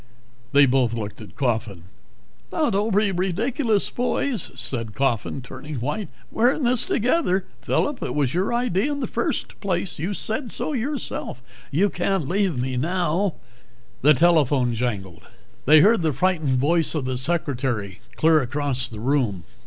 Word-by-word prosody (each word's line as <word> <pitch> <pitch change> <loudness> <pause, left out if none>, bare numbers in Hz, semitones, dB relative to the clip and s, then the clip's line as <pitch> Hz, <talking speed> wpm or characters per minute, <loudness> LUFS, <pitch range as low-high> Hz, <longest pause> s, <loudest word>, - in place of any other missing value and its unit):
They 140 0 +7
both 125 -3 +2
looked 105 -1 -5
at 105 - -12
Coffin. 110 -8 -1 0.7
"Now 305 -6 +1
don't 205 +1 +1
be 210 -1 +3
ridiculous, 205 - 0
boys," 245 0 -1
said 115 -3 -4
Coffin, 130 0 -1
turning 135 +4 -8
white. 150 - -3 0.2
"We're 240 +4 +3
in 295 - -4
this 245 -1 +1
together. 210 - +1 0.2
Phillip, 290 -2 0
it - - -3
was 140 -4 +1
your 185 +6 0
idea 240 0 +1
in 285 - -3
the - - -1
first - - -3
place 185 -4 -2
you 185 +6 -2
said 225 +5 -3
so 310 - -2
yourself! 250 - -3 0.3
You 185 +7 +2
can't 180 -4 -1
leave 185 -4 +1
me 130 +1 -2
now 175 +4 0 0.3
" 120 +1 -32
The 150 +2 +6
telephone 145 -6 +3
jangled. 95 -9 -4 0.4
They 155 +1 +8
heard 215 +2 +5
the 160 -3 +1
frightened 155 -3 +1
voice 160 +5 +2
of 145 -4 -1
the 130 -1 -1
secretary 125 - -2 0.2
clear 160 -1 +5
across 135 0 -2
the 110 - -8
room. 120 - 0
155 Hz, 160 wpm, -23 LUFS, 125-200 Hz, 0.7 s, They